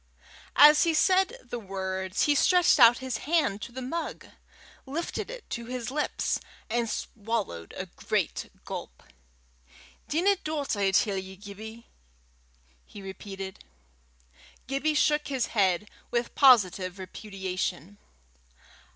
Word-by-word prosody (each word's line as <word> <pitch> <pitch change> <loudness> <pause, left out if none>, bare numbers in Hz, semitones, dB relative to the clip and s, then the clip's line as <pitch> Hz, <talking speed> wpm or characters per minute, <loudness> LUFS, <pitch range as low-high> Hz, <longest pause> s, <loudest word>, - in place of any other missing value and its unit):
As 300 +1 +8
he 330 -1 +2
said 380 +7 +3
the 240 - -6
words, 190 -1 -2
he 295 - +4
stretched 355 +3 +4
out 240 0 +8
his 260 -1 -3
own - - -11
hand 295 -10 +1
to - - -7
the 260 +1 -6
mug, 330 +7 -4 0.6
lifted 330 - -4
it - - -9
to 235 0 -4
his 250 0 -4
lips, 300 +2 -1 0.3
and 235 -1 0
swallowed 205 - -3
a - - -3
great - - -2 0.2
gulp. - - -7 1.0
"Dinna 385 +6 +2
do 305 -2 -2
't, - - -1
I 195 -1 +3
tell 195 +1 +2
ye, 190 0 -6
Gibbie," 215 +4 -10 1.0
he 200 - -11
repeated. 195 0 -7 1.1
Gibbie 275 +4 0
shook 300 0 +2
his 265 -4 0
head 195 -2 +2 0.2
with 240 0 -1
positive 195 -8 +5
repudiation. 190 -2 -5
235 Hz, 125 wpm, -28 LUFS, 195-295 Hz, 1.1 s, As